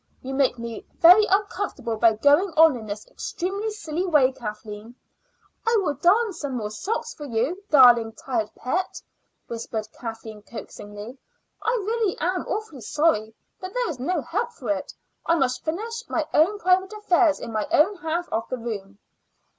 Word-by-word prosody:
You 265 Hz, +1 st, -5 dB
make 265 Hz, -2 st, +2 dB
me 230 Hz, -1 st, -6 dB
very 365 Hz, +6 st, +7 dB
uncomfortable 395 Hz, -, -1 dB
by 225 Hz, +1 st, +4 dB
going 290 Hz, -, +4 dB
on 320 Hz, -3 st, +7 dB
in 220 Hz, -3 st, -8 dB
this 210 Hz, +1 st, -6 dB
extremely 395 Hz, +5 st, -4 dB
silly 360 Hz, -6 st, -3 dB
way, 300 Hz, -8 st, +4 dB
Kathleen." 215 Hz, -1 st, -8 dB, 0.7 s
"I 460 Hz, 0 st, +4 dB
will 315 Hz, -7 st, 0 dB
darn 405 Hz, +8 st, +3 dB
some 280 Hz, -6 st, -4 dB
more 210 Hz, -2 st, -4 dB
socks 450 Hz, -, -3 dB
for 295 Hz, -, -9 dB
you, 260 Hz, -, -1 dB
darling, 240 Hz, -5 st, +6 dB
tired 225 Hz, -2 st, -2 dB
pet," 360 Hz, +9 st, -2 dB, 0.5 s
whispered 225 Hz, -2 st, -5 dB
Kathleen 225 Hz, -2 st, -8 dB
coaxingly. 210 Hz, +2 st, -9 dB, 0.4 s
"I -, -, 0 dB, 0.2 s
really 445 Hz, -3 st, 0 dB
am 360 Hz, +3 st, -1 dB
awfully 415 Hz, -, -4 dB
sorry, 225 Hz, -4 st, +1 dB, 0.2 s
but 375 Hz, +1 st, -8 dB
there -, -, 0 dB
is 270 Hz, -, -8 dB
no 350 Hz, +9 st, -1 dB
help -, -, -2 dB
for 245 Hz, -, -4 dB
it. 190 Hz, -2 st, -3 dB, 0.4 s
I 335 Hz, -, +4 dB
must 260 Hz, -5 st, 0 dB
finish 455 Hz, +8 st, -4 dB
my 320 Hz, -, 0 dB
own 360 Hz, +7 st, +4 dB
private 375 Hz, +1 st, +2 dB
affairs 360 Hz, -7 st, +2 dB
in -, -, -6 dB
my 215 Hz, -1 st, -1 dB
own 375 Hz, +7 st, +4 dB
half 340 Hz, +1 st, -2 dB
of 225 Hz, +1 st, -2 dB
the 255 Hz, -, -2 dB
room." 205 Hz, -4 st, -6 dB
290 Hz, 165 wpm, -24 LUFS, 230-375 Hz, 0.7 s, very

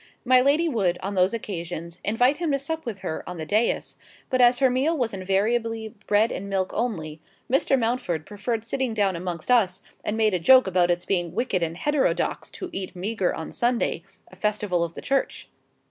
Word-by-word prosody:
My 255 Hz, 0 st, +6 dB
lady 290 Hz, +6 st, +3 dB
would, 195 Hz, -, +1 dB
on 200 Hz, +2 st, -3 dB
those 185 Hz, 0 st, +3 dB
occasions, 170 Hz, -5 st, -5 dB
invite 245 Hz, +7 st, +2 dB
him 340 Hz, -1 st, -2 dB
to -, -, +3 dB
sup 320 Hz, +1 st, -5 dB
with 205 Hz, -5 st, -5 dB
her 160 Hz, -, -3 dB
on 180 Hz, -, -6 dB
the 160 Hz, -, -5 dB
dais; 215 Hz, +8 st, 0 dB, 0.3 s
but 255 Hz, -1 st, +3 dB
as 245 Hz, 0 st, +6 dB
her 265 Hz, -, +4 dB
meal 285 Hz, +6 st, +1 dB
was 240 Hz, -5 st, -1 dB
invariably 220 Hz, +4 st, 0 dB, 0.2 s
bread 210 Hz, +2 st, +3 dB
and 200 Hz, -, -5 dB
milk 190 Hz, -1 st, -1 dB
only, 160 Hz, -10 st, -3 dB, 0.3 s
Mr. 270 Hz, 0 st, +3 dB
Mountford 225 Hz, -, -1 dB
preferred 215 Hz, +2 st, -3 dB
sitting 245 Hz, -1 st, -2 dB
down 200 Hz, -3 st, +1 dB
amongst 170 Hz, +4 st, -4 dB
us, 195 Hz, -7 st, +3 dB, 0.2 s
and 215 Hz, -, -2 dB
made 215 Hz, -2 st, +3 dB
a 180 Hz, -, +1 dB
joke 255 Hz, +10 st, +7 dB
about 180 Hz, -2 st, +2 dB
its 175 Hz, 0 st, 0 dB
being 175 Hz, -3 st, -1 dB
wicked 225 Hz, -6 st, 0 dB
and 165 Hz, 0 st, -2 dB
heterodox 295 Hz, +7 st, 0 dB
to 370 Hz, -2 st, -7 dB
eat 185 Hz, -1 st, -4 dB
meagre 195 Hz, 0 st, -1 dB
on 160 Hz, -, -6 dB
Sunday, 240 Hz, 0 st, 0 dB, 0.3 s
a -, -, -13 dB
festival 210 Hz, -4 st, 0 dB
of 170 Hz, 0 st, -5 dB
the -, -, -8 dB
Church. 275 Hz, 0 st, -1 dB
210 Hz, 195 wpm, -25 LUFS, 180-250 Hz, 0.3 s, joke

